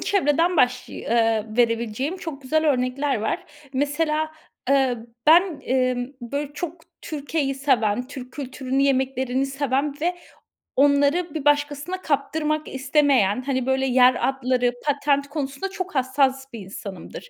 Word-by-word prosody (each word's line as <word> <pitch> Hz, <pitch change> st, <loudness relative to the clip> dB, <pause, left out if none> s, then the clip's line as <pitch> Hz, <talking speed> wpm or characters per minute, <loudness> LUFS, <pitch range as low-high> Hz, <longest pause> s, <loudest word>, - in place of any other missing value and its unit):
çevreden 340 Hz, -1 st, +2 dB
başlıy 250 Hz, -2 st, 0 dB
ııı, 225 Hz, -1 st, +1 dB
verebileceğim 235 Hz, -, 0 dB
çok 320 Hz, -6 st, -7 dB
güzel 315 Hz, +4 st, +1 dB
örnekler 260 Hz, +2 st, 0 dB
var. 345 Hz, -, -2 dB, 0.3 s
Mesela, 305 Hz, +3 st, 0 dB, 0.4 s
eee, 265 Hz, -3 st, +3 dB, 0.3 s
ben, 335 Hz, +1 st, +5 dB
emm, 255 Hz, -1 st, 0 dB
böyle, 280 Hz, +4 st, -4 dB
çok 335 Hz, +2 st, -5 dB, 0.2 s
Türkiye'yi 290 Hz, -2 st, -2 dB
seven, 250 Hz, -4 st, +1 dB
Türk 255 Hz, -2 st, -9 dB
kültürünü, 265 Hz, -1 st, -2 dB
yemeklerini 265 Hz, -1 st, +1 dB
seven 275 Hz, +1 st, -1 dB
ve 350 Hz, +3 st, 0 dB, 0.6 s
onları 285 Hz, +4 st, +3 dB
bir 305 Hz, -3 st, -4 dB
başkasına 290 Hz, +5 st, +1 dB
kaptırmak 305 Hz, +1 st, -1 dB
istemeyen, 265 Hz, -5 st, +2 dB
hani, 260 Hz, -2 st, -1 dB
böyle 265 Hz, 0 st, +1 dB
yer 255 Hz, 0 st, +4 dB
adları, 255 Hz, -2 st, 0 dB
patent 285 Hz, -1 st, +1 dB
konusunda 285 Hz, +4 st, -4 dB
çok 380 Hz, -3 st, -6 dB
hassas 265 Hz, 0 st, +1 dB
bir 230 Hz, -, -6 dB
insanımdır. 195 Hz, -, -9 dB
275 Hz, 125 wpm, -23 LUFS, 255-295 Hz, 0.6 s, ben